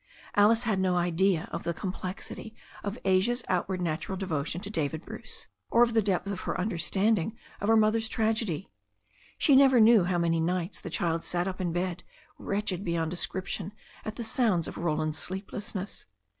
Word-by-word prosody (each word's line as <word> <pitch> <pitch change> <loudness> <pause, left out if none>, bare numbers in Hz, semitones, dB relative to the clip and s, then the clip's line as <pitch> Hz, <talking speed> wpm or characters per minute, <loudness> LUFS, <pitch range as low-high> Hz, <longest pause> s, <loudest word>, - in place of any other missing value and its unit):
Alice 220 +3 +5
had 220 -5 +1
no 185 -1 +2
idea 175 0 +2
of - - -3
the 170 - -2
complexity 190 +4 -5 0.3
of 205 +3 -3
Asia's 195 +6 +2
outwardly 185 0 0
natural 165 +3 -2
devotion 165 -4 -2
to 205 0 -6
David 160 -4 -2
Bruce, - - -8 0.2
or 235 - +6
of 235 -1 +1
the 225 - +4
depth 190 -3 0
of 190 - -4
her - - -3
understanding 200 +2 +1 0.2
of 205 - -2
her 225 0 +6
mother's 220 +1 +3
tragedy. 220 -7 0 0.7
She 285 - +5
never 265 -2 +7
knew 220 -4 +7
how 180 0 +1
many 165 -1 +2
nights 175 +2 -1
the - - -6
child 165 -3 0
sat 175 +1 -1
up 185 0 -4
in 175 -2 0
bed, 175 +1 -2 0.4
wretched 200 -2 -2
beyond 165 -3 -1
description 190 +2 -3 0.3
at 215 - -5
the 235 - -4
sounds 220 -7 +1
of - - -6
Roland's 155 -2 -1
sleeplessness. 195 +1 -5
190 Hz, 170 wpm, -29 LUFS, 175-215 Hz, 0.7 s, never